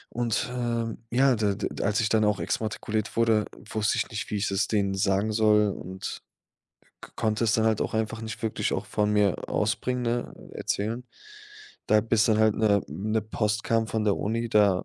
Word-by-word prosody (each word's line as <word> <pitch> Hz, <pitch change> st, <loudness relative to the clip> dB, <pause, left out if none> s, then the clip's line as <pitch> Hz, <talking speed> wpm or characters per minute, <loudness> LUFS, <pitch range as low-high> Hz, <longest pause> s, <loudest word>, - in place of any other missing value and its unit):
Und, 120 Hz, 0 st, 0 dB
ähm, 115 Hz, -2 st, -2 dB
ja, 130 Hz, +1 st, +4 dB
d 105 Hz, -2 st, 0 dB
d -, -, -3 dB
als 100 Hz, +1 st, +1 dB
ich 110 Hz, -, +2 dB
dann 110 Hz, 0 st, +2 dB
auch 105 Hz, -1 st, +2 dB
exmatrikuliert 110 Hz, 0 st, -2 dB
wurde, 110 Hz, -2 st, +3 dB, 0.3 s
wusste 110 Hz, 0 st, +1 dB
ich -, -, -1 dB
nicht, 110 Hz, -2 st, -5 dB
wie 105 Hz, -, 0 dB
ich 100 Hz, -, 0 dB
es 100 Hz, +2 st, 0 dB
denen 100 Hz, -3 st, +1 dB
sagen 95 Hz, +2 st, +1 dB
soll 105 Hz, -1 st, +4 dB
und 95 Hz, 0 st, -7 dB, 0.8 s
k -, -, -11 dB
konnte 110 Hz, 0 st, 0 dB
es 110 Hz, -, +2 dB
dann 110 Hz, 0 st, +2 dB
halt 110 Hz, -1 st, +2 dB
auch -, -, -3 dB
einfach 110 Hz, 0 st, -2 dB
nicht 110 Hz, +1 st, -6 dB
wirklich 110 Hz, -, -1 dB
auch -, -, -2 dB
von 105 Hz, 0 st, 0 dB
mir 105 Hz, -4 st, +1 dB
aus -, -, +1 dB
bringen, 125 Hz, 0 st, -2 dB
ne, 120 Hz, 0 st, -2 dB, 0.2 s
erzählen. 115 Hz, +5 st, -2 dB, 0.8 s
Da 110 Hz, -, +5 dB
bis 110 Hz, 0 st, +2 dB
dann 110 Hz, -1 st, +3 dB
halt 110 Hz, -1 st, +4 dB
'ne 105 Hz, -2 st, +3 dB
'ne 110 Hz, +2 st, -1 dB
Post 105 Hz, 0 st, -1 dB
kam 115 Hz, -1 st, +1 dB
von 110 Hz, -1 st, -1 dB
der 100 Hz, -, +2 dB
Uni, 115 Hz, +3 st, -2 dB
da 100 Hz, -4 st, +3 dB
110 Hz, 200 wpm, -26 LUFS, 105-115 Hz, 0.8 s, Da